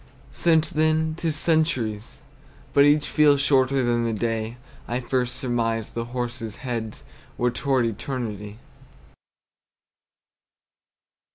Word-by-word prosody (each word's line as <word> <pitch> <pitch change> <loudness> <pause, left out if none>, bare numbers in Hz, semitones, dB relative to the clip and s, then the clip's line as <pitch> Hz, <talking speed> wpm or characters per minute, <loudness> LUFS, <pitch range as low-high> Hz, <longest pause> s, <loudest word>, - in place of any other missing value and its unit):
Since 160 -2 +2
then 155 +1 +1
't 165 - -3
is 155 - 0
centuries; 145 -10 0 0.5
but 140 - +6
each 145 +1 +3
Feels 145 -2 +4
shorter 135 -1 +3
than 120 -1 +1
the 115 -1 0
day 115 +1 -2 0.3
I 120 +1 -1
first 125 0 -1
surmised 115 -4 -1
the 115 0 -3
horses' 120 -2 -4
heads 115 -4 -4 0.3
Were 125 0 +1
toward 130 0 +1
eternity. 110 -3 -4
125 Hz, 110 wpm, -24 LUFS, 115-145 Hz, 0.5 s, but